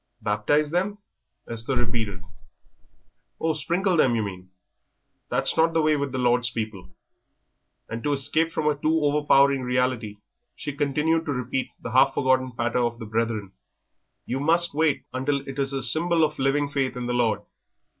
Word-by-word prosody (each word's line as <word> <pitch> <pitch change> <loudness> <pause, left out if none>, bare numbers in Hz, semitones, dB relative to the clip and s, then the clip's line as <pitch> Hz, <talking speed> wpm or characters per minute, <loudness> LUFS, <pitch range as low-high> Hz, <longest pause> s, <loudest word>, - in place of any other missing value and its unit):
"Baptise 105 +9 +1
them?" 190 +4 -1 0.5
Esther 115 +3 -3
repeated. 110 -6 -2 1.2
"Oh, 160 0 +1
sprinkle 175 +5 0
them, 130 -6 +4
you 110 - 0
mean. 95 -2 -7 0.8
That's - - +1
not 165 0 +2
the 165 - +4
way 155 0 +3
with 140 -2 -2
the 130 - -3
Lord's 120 -1 +2
people;" 110 -5 -5 1.0
and 115 +1 -5
to 145 - 0
escape 155 +4 0
from 155 -2 -1
a 150 - +4
too 155 +3 0
overpowering 140 -2 +3
reality 125 -4 -1 0.4
she 145 - -5
continued 150 +3 +1
to 145 - -1
repeat 125 +1 -2
the 120 - -7
half 135 +2 +4
forgotten 130 -1 +1
patter 120 +1 -1
of 120 -1 0
the 115 - -8
Brethren, 110 -2 -2 0.7
"You 130 - -3
must 165 +3 +3
wait 155 -1 +1
until 135 +2 -1
it 135 +1 -6
is 135 0 +1
a 135 -1 -2
symbol 165 +6 +4
of 150 -1 -1
living 140 +2 +1
faith 135 -3 -2
in 125 - -4
the 120 - -2
Lord!" 120 -3 +1
135 Hz, 165 wpm, -25 LUFS, 120-150 Hz, 1.2 s, them